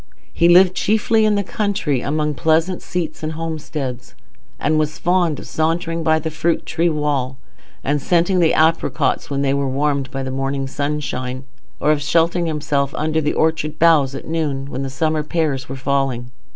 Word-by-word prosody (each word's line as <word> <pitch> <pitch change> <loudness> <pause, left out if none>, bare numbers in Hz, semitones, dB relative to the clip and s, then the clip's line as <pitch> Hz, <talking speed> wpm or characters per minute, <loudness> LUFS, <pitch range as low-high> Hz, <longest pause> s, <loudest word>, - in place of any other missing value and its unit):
He 170 - +3
lived 180 +1 +7
chiefly 220 +3 +2
in 210 -1 +3
the 200 - 0
country, 190 - -1
among 150 +2 -1
pleasant 160 +5 +1
seats 170 -3 -4
and 155 0 -3
homesteads, 155 -6 -5 0.4
and 155 0 +1
was 155 0 -1
fond 175 -4 +1
of - - -9
sauntering 165 +1 -1
by 160 0 +3
the 160 0 -3
fruit 165 +2 0
tree 170 +1 +1
wall 145 -4 -1 0.5
and 145 +1 0
scenting 175 +4 +2
the 165 -2 +4
apricots 160 -4 +1
when 140 -1 -1
they 135 -1 +2
were 140 -1 0
warmed 140 0 0
by 135 0 -4
the 130 - -4
morning 135 +1 -2
sunshine, 135 -2 -3 0.4
or 150 - +3
of 150 -1 +1
sheltering 170 +3 +2
himself 150 -3 -1
under 155 +1 0
the 150 - 0
orchard 155 -1 0
boughs 150 -5 +4
at - - -7
noon, 145 -4 -2
when 130 - -4
the 135 - -3
summer 155 +2 0
pears 150 -4 -2
were 135 - -4
falling. 130 -2 -1
155 Hz, 180 wpm, -20 LUFS, 140-165 Hz, 0.5 s, lived